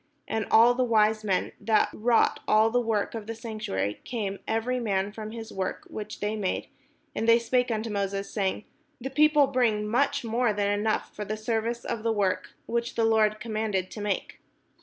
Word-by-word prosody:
And 220 0 -2
all 235 +2 +7
the 255 +1 +1
wise 215 -2 +3
men, 195 -3 0
that 220 -1 +2
wrought 230 +1 +2
all 220 +1 +4
the 245 +1 +2
work 220 -3 -1
of 220 -2 -6
the 230 - -4
sanctuary, 215 - -3
came 205 -5 -3
every 230 +3 0
man 200 -3 0
from 215 0 -7
his 225 0 -8
work 190 -1 -3
which 215 0 -7
they 210 +1 -1
made; 200 -4 -2 0.4
and 225 - 0
they 230 - +8
spake 245 +1 +1
unto 220 0 -2
Moses, 200 -1 -2
saying: 195 0 -1 0.3
"The 265 +2 -5
people 300 0 +5
bring 235 -6 +1
much 245 +6 +1
more 230 0 +1
than 205 0 0
enough 210 +1 -1
for 210 - -4
the 215 +1 -4
service 230 +2 -2
of 225 - -3
the 230 +1 +1
work, 200 -4 -1
which 235 0 -2
the 230 - +2
Lord 215 -1 +3
commanded 215 -4 -2
to 210 - -7
make." 205 -1 -3
220 Hz, 190 wpm, -27 LUFS, 210-235 Hz, 0.4 s, they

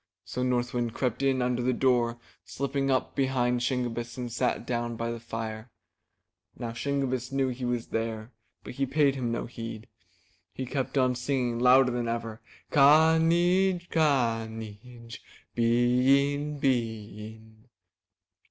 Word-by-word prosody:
So 125 +6 -4
North 125 -1 0
Wind 120 -2 -2
crept 125 -1 -1
in 135 -2 +2
under 125 0 0
the 130 +1 +1
door, 120 -2 +2 0.3
slipped 140 0 -5
up 130 -1 0
behind 125 -2 +1
Shingebiss 120 -2 -2
and 120 -2 -4
sat 125 0 -1
down 120 -1 -2
by 115 +1 -3
the 115 - -5
fire. 115 0 -6 0.9
Now 120 -2 -4
Shingebiss 130 -1 -2
knew 135 -1 +1
he 125 0 -4
was 120 -1 -2
there, 115 0 -3 0.3
but - - -8
he 135 +2 -1
paid 140 -1 +2
no 115 -1 -2
heed. 115 -2 -7 0.7
He 130 - -4
kept 135 +1 -3
on 130 -1 +3
singing 125 -1 -1
louder 125 +1 +5
than 120 -1 -2
ever. 115 -1 -4 0.3
''Ka 155 +3 +6
neej! 175 +2 +2
ka 125 -8 +2
neej! 115 +2 -10 0.3
Bee 125 +4 +3
in, 145 +1 -4
bee 110 -6 -2
in." 110 +1 -20
125 Hz, 145 wpm, -28 LUFS, 115-135 Hz, 0.9 s, Ka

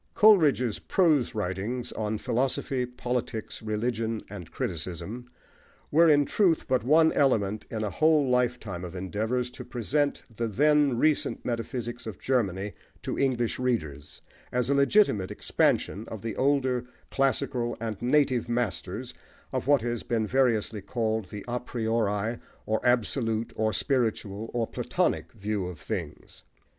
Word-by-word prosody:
Coleridge's 155 - +5
prose 155 - +2
writings 105 +5 -3
on 110 0 -2
philosophy, 125 +2 -1
politics, 125 -2 -4
religion, 110 +1 -2
and 90 -6 -8
criticism, 90 +9 -5 0.6
were, 165 +2 +6
in 145 -1 +5
truth, 175 0 +2
but 130 -3 +1
one 160 +5 +5
element 110 -7 +1
in 110 -1 -3
a 105 - -2
whole 155 -3 +3
lifetime 120 -7 0
of 90 +1 -7
endeavours 110 +7 -2
to - - -8
present 140 +5 -1
the 115 +2 -1
then 145 +3 +3
recent 155 +4 +1
metaphysics 120 0 -4
of 105 -5 -6
Germany 100 -6 -1 0.3
to - - -3
English 125 -4 0
readers, 80 - -2 0.3
as 125 +1 0
a - - +5
legitimate 140 - +3
expansion 105 +3 0
of 110 -3 -7
the 115 -2 -3
older, 130 -3 +1 0.3
classical 125 -2 0
and 110 -3 -4
native 125 -2 +2
masters 120 -4 -2 0.4
of - - -2
what 140 -5 +4
has 120 -1 -2
been 115 -2 -1
variously 115 -3 +1
called 110 0 -1
the 105 +1 -7
a 120 +1 -1
priori, 115 -2 -1 0.3
or 110 0 0
absolute, 115 -1 +1
or 110 0 +1
spiritual, 110 -5 -1
or 120 -1 0
Platonic, - - -1
view 100 -2 -2
of 90 -3 -7
things. - - -6
120 Hz, 135 wpm, -27 LUFS, 110-130 Hz, 0.6 s, were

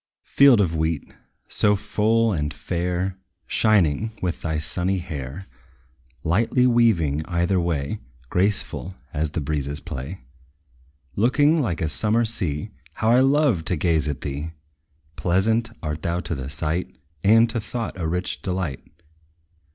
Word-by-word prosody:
Field 140 -5 +6
of 85 -5 +1
wheat, 80 -1 -2 0.3
so 105 0 +3
full 110 +2 +1
and 75 -3 -1
fair, 90 +2 -2 0.3
Shining, 105 -1 +2
with 90 -2 -2
thy 80 -2 -1
sunny 90 +4 -1
hair 80 0 -6 0.8
Lightly 115 +9 +2
waving 100 - +3
either 90 +2 +1
way, 80 -5 -1 0.3
Graceful 95 +1 -1 0.2
as 75 +1 0
the 80 +2 -3
breezes 70 0 -2
play 70 +7 -6 0.9
Looking 145 +8 +3
like 90 - -2
a 80 - +1
summer 110 +9 +1
sea; 90 -10 -2 0.2
How 110 +1 +1
I 125 - +6
love 135 - +3
to 90 - +1
gaze 80 -2 +1
at 70 -4 -3
thee! 75 +3 -4 0.6
Pleasant 110 +6 +1
art 75 -1 -3
thou 85 +2 -1
to 85 0 -3
the 65 -3 -5
sight; 80 +1 -2 0.3
And 115 +3 +6
to 115 - -1
thought 115 +1 -4
a 85 -3 -3
rich 90 +2 -2
delight. 90 -8 -3
90 Hz, 135 wpm, -23 LUFS, 80-110 Hz, 0.9 s, Field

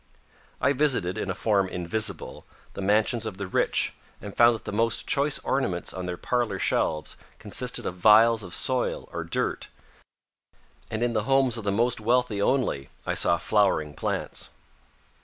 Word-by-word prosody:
I 140 - +2
visited, 125 -11 +2
in - - -4
a 95 - -2
form 100 -3 +1
invisible, 95 +2 -3 0.3
the - - -6
mansions 110 +3 +1
of 100 -4 -6
the 100 - -4
rich 95 - 0 0.3
and 100 -1 -9
found 120 0 +5
that 110 - -11
the - - -4
most 115 +2 0
choice 145 -1 +1
ornaments 95 -11 -2
on 90 -1 -5
their 90 -1 -4
parlor 120 -4 -1
shelves 75 -4 -1 0.2
consisted - - -1
of 90 - -4
vials 110 +4 +5
of 90 -3 -8
soil 130 -1 +1
or - - -4
dirt, - - -2 1.2
and 110 +1 -2
in 120 -1 0
the 110 -2 -1
homes 135 -2 +2
of 115 -3 -5
the 100 - +1
most 115 +3 +1
wealthy 120 -2 +1
only 110 - 0 0.2
I - - -1
saw 85 - +2
flowering 95 -7 +1
plants. - - -3
110 Hz, 165 wpm, -26 LUFS, 95-120 Hz, 1.2 s, found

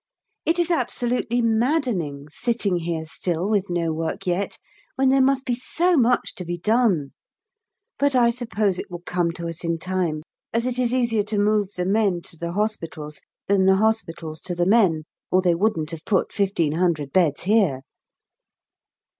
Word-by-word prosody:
It 330 +2 +3
is 345 0 +1
absolutely 245 -4 0
maddening 225 - 0
sitting 225 -2 0
here 165 -1 -3
still 170 +2 -2
with 205 -3 0
no 170 -2 0
work 160 0 -3
yet, 180 +2 -1 0.4
when 265 -1 +3
there 270 0 +4
must 265 0 +2
be 245 - 0
so 340 +8 +1
much 250 -3 +2
to 180 - -4
be 175 0 -4
done; 200 - +1 0.9
but 285 -1 +2
I 240 -2 +5
suppose 220 -6 -1
it - - -6
will 175 -1 -8
come 175 -1 0
to 170 0 -6
us 165 +1 -5
in 170 -1 0
time, 170 -3 -2 0.3
as 230 +1 +1
it 255 0 -1
is 245 -2 +2
easier 235 -4 +2
to 215 0 -2
move 205 -1 +2
the 180 - -2
men 195 -3 +1
to - - -5
the 170 +1 -5
hospitals 165 -8 -3 0.3
than 195 -1 +3
the 190 - +6
hospitals 180 -7 -1
to 180 - -2
the 175 0 +1
men, 190 -6 +3 0.3
or 185 0 +3
they 175 -2 +4
wouldn't 170 -4 0
have 165 -1 -7
put 195 - 0
1500 170 -6 0
beds 165 -6 +2
here. 190 -9 +2
190 Hz, 170 wpm, -23 LUFS, 170-235 Hz, 0.9 s, the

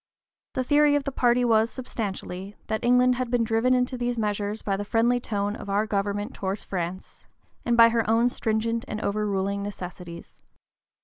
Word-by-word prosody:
The 260 - 0
theory 290 +2 +4
of 290 - +1
the 275 - -3
party 245 -1 +2
was, 225 -1 +3
substantially, 200 -5 -5
that 220 - -3
England 250 +1 +4
had 255 -1 -2
been 240 -1 +2
driven 225 +3 +2
into 250 0 0
these 240 0 -1
measures 210 0 -2
by 195 - 0
the 200 - -3
friendly 230 +4 +2
tone 205 -3 -2
of 200 - -9
our 205 +2 +1
government 205 0 -2
towards 195 +1 -4
France, 180 0 -5 0.4
and 235 -1 +2
by 230 0 +8
her 230 -2 0
own 230 +2 +4
stringent 230 0 -1
and 215 - -4
overruling 200 -1 -1
necessities. 180 -4 -8
220 Hz, 175 wpm, -25 LUFS, 200-245 Hz, 0.4 s, by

